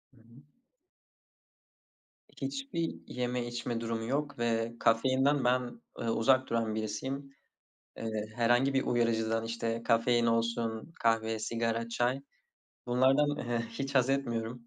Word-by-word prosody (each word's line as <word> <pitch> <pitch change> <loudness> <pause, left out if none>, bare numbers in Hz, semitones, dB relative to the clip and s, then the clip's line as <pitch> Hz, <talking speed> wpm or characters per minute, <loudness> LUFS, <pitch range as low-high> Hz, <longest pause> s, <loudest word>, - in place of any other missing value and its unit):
Hı - - -23
hı. 115 +3 -18 2.0
Hiçbir 275 -12 -2
yeme 125 -1 -2
içme 120 -1 -3
durumu 115 -1 -2
yok 145 +3 -2
ve 115 0 0
kafeinden 130 +4 +3
ben, 125 -1 0 0.2
ııı, 115 - 0
uzak 130 +3 +3
duran 115 -2 0
birisiyim. 130 +6 -4 0.6
Eee, 110 -1 -3
herhangı 120 +3 +3
bir 135 - +2
uyarıcıdan 115 -1 +1
işte 115 0 -2
kafein 120 +1 +3
olsun 115 +3 0
kahve, 115 -1 +2
sigara, 115 +1 -1
çay. 120 +3 0 0.7
Bunlardan, 135 +4 +3
eee, 115 -1 0
hiç 135 +4 -4
hazetmiyorum. 125 -3 0
120 Hz, 115 wpm, -31 LUFS, 115-130 Hz, 2.0 s, kafeinden